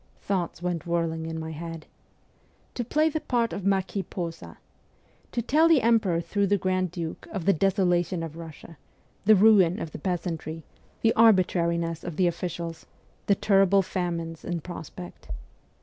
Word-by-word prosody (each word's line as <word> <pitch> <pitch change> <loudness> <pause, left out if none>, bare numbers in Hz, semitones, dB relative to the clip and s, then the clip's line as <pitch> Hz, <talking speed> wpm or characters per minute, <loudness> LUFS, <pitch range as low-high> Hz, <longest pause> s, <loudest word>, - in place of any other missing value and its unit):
Thoughts 175 -3 -3
went 175 -2 -2
whirling 165 -1 -1
in 160 0 -4
my 160 0 -5
head. 165 0 -7 0.9
To 245 - -2
play 305 +7 +2
the 315 0 -1
part 235 -2 0
of 195 -1 -3
Marquis 195 0 0
Posa? 165 - -6 0.7
To 240 - -1
tell 310 +7 +4
the 315 -8 +4
emperor 215 -7 +3
through 200 +3 0
the 205 +1 +3
grand 185 -1 0
duke 165 -1 -6
of 190 -6 -4
the 200 - +5
desolation 180 -2 +1
of 160 -1 -6
Russia, 165 -1 -11 0.5
the 215 +1 +7
ruin 195 -2 +5
of 160 - -5
the - - -8
peasantry, 165 -2 -3 0.4
the 225 - +4
arbitrariness 170 -6 +3
of 175 -3 -5
the 185 - +2
officials, 170 -1 -3 0.4
the 200 - +4
terrible 195 -1 +4
famines 170 -3 -3
in 175 -2 -3
prospect 175 +1 -9
180 Hz, 155 wpm, -26 LUFS, 165-200 Hz, 0.9 s, the